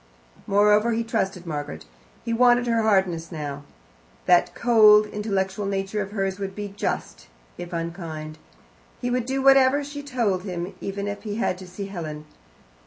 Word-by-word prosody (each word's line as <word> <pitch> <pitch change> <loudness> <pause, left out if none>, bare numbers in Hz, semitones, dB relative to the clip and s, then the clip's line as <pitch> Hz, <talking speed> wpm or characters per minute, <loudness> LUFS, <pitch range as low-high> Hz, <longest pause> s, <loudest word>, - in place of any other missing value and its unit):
Moreover, 210 +3 +4
he 230 +1 0
trusted 195 -5 -2
Margaret. 145 - -5 0.4
He 230 - -1
wanted 245 +1 +4
her 230 -1 +1
hardness 190 -6 +1
now. 145 -3 -5 0.6
That 175 - +4
cold, 215 -3 +6
intellectual 200 -1 -2
nature 195 +1 -2
of 195 - -4
hers 195 -1 -2
would 195 -1 -5
be 205 -1 -5
just, - - -4 0.3
if 175 0 -8
unkind. 165 -2 -5 0.6
He 245 - -2
would 245 -1 -1
do 265 0 -1
whatever 270 +1 +5
she 285 0 -7
told 235 -10 -1
him, 180 0 -5
even 200 +1 -4
if 205 0 -5
he 210 -2 -5
had 230 -4 0
to 185 - -10
see 185 +3 -6
Helen. 155 -6 -6
200 Hz, 160 wpm, -24 LUFS, 180-230 Hz, 0.6 s, cold